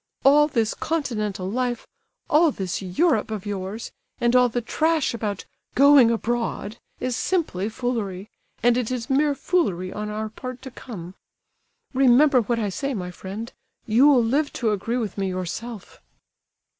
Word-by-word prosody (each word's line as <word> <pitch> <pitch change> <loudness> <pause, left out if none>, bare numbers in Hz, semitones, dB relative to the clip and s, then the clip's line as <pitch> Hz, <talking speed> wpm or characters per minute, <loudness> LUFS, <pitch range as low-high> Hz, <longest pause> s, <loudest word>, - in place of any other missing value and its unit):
All 295 +2 +6
this 230 -7 0
continental 215 - -2
life, 240 +3 -2 0.4
all 315 +2 +5
this 190 - -3
Europe 220 - +1
of 215 -2 -5
yours, 205 +2 -5 0.3
and 240 +1 +2
all 250 -1 +5
the 245 - -1
trash 315 +5 0
about 210 -4 -4 0.3
'going 280 -3 +7
abroad' 230 -1 -2 0.2
is 255 -1 -2
simply 240 - -1
foolery, 220 -5 -3 0.4
and 240 0 +4
it 245 -3 -1
is 250 -1 -3
mere 285 +1 +3
foolery 200 - 0
on 210 0 -4
our 215 +1 -3
part 255 +3 -8
to 265 - -8
come. 185 -9 -9 0.8
Remember 265 +1 +5
what 235 +1 -1
I 215 -3 -1
say, 275 +7 -3
my 180 -3 -4
friend; 200 +6 -7 0.3
you'll 250 +3 +5
live 285 +6 +1
to 230 -4 0
agree 220 +4 -1
with 210 -5 -3
me 195 - 0
yourself." 190 +4 -6
235 Hz, 150 wpm, -24 LUFS, 205-265 Hz, 0.8 s, going